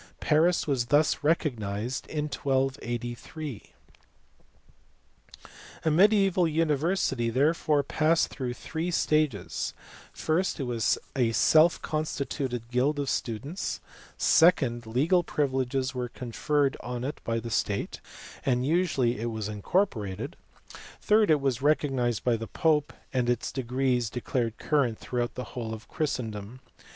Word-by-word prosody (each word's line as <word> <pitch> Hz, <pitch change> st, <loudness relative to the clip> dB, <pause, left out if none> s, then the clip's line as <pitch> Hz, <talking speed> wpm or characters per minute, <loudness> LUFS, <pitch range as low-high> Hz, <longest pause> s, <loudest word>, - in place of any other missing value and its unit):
Paris 165 Hz, +3 st, +3 dB
was 135 Hz, -5 st, 0 dB
thus 145 Hz, +3 st, +3 dB
recognized 125 Hz, -6 st, -1 dB
in 150 Hz, -1 st, -2 dB
1283. 135 Hz, -1 st, -3 dB, 2.1 s
A 160 Hz, -, +3 dB
mediaeval 195 Hz, 0 st, +4 dB
university 155 Hz, -5 st, +1 dB
therefore 145 Hz, +3 st, +2 dB
passed 155 Hz, +3 st, +2 dB
through 125 Hz, -3 st, -4 dB
three 160 Hz, +7 st, -4 dB
stages: 150 Hz, -, 0 dB, 0.4 s
first, 165 Hz, +4 st, -1 dB
it -, -, -1 dB
was 120 Hz, -3 st, +1 dB, 0.2 s
a 120 Hz, -4 st, +2 dB
self 155 Hz, +9 st, +5 dB
constituted 140 Hz, -5 st, -3 dB
guild 135 Hz, +4 st, +2 dB
of 140 Hz, -2 st, -1 dB
students; 135 Hz, -, -3 dB, 0.4 s
second, 130 Hz, -9 st, +4 dB
legal 150 Hz, +11 st, +3 dB
privileges 135 Hz, -3 st, -1 dB
were 125 Hz, -1 st, -3 dB
conferred 135 Hz, +4 st, 0 dB
on 125 Hz, 0 st, -5 dB
it 145 Hz, +3 st, -4 dB
by 115 Hz, 0 st, -1 dB
the 115 Hz, +1 st, -6 dB
state, 100 Hz, -1 st, -1 dB, 0.4 s
and 125 Hz, -1 st, +1 dB
usually 145 Hz, -7 st, +1 dB
it 120 Hz, +1 st, -2 dB
was 110 Hz, -2 st, -4 dB
incorporated; 105 Hz, -, -1 dB, 0.6 s
third, 215 Hz, -1 st, +3 dB
it 155 Hz, -2 st, +5 dB
was 130 Hz, -3 st, 0 dB
recognized 135 Hz, -6 st, +1 dB
by 120 Hz, -2 st, +2 dB
the 115 Hz, 0 st, -5 dB
pope 150 Hz, -3 st, +1 dB, 0.2 s
and 125 Hz, -2 st, +1 dB
its 120 Hz, -1 st, 0 dB
degrees 125 Hz, -2 st, 0 dB
declared 120 Hz, -1 st, -2 dB
current 135 Hz, -7 st, +1 dB
throughout 120 Hz, -1 st, -3 dB
the 125 Hz, -, -4 dB
whole 115 Hz, -3 st, -4 dB
of 110 Hz, -, -13 dB
Christendom. 115 Hz, -6 st, -3 dB
135 Hz, 120 wpm, -28 LUFS, 120-155 Hz, 2.1 s, self